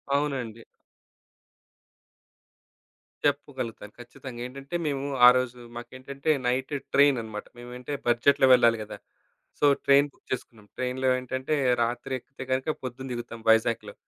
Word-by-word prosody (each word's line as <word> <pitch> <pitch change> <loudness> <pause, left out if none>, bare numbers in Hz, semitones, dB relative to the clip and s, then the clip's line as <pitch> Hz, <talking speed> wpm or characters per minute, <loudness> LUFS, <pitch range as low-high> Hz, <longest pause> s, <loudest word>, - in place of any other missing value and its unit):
అవునండి. 130 -6 -2 2.6
చెప్పగలుగుతాను. 135 -7 -2
ఖచ్చితంగా. 120 0 -10
ఏంటంటే, 135 +5 -8
మేము 140 -1 -2 0.2
ఆరోజు 125 0 +4 0.2
మాకేంటంటే, 130 +4 -6 0.2
నైట్ 130 +3 -1 0.2
ట్రైన్ 140 -2 +5
అన్నమాట. 110 -2 -7
మేమంటే 125 +3 -7
బడ్జెట్‌లో 130 +3 +4
వెళ్ళాలి 115 -2 +5
గదా! 105 - -9 0.6
సో - - +3 0.2
ట్రైన్ 140 +1 +5
బుక్ - - -31
చేసుకున్నాం. 115 -4 -6
ట్రైన్‌లో 130 +1 -1
ఏంటంటే, 130 +4 -2 0.3
రాత్రి 120 +3 -3
ఎక్కితే 135 +2 -11
గనుక, 130 +2 0 0.2
పొద్దున్న 130 +1 -6
దిగుతాం 115 -1 -7
వైజాగ్‌లో. 110 -2 +2
130 Hz, 110 wpm, -27 LUFS, 120-135 Hz, 2.6 s, ట్రైన్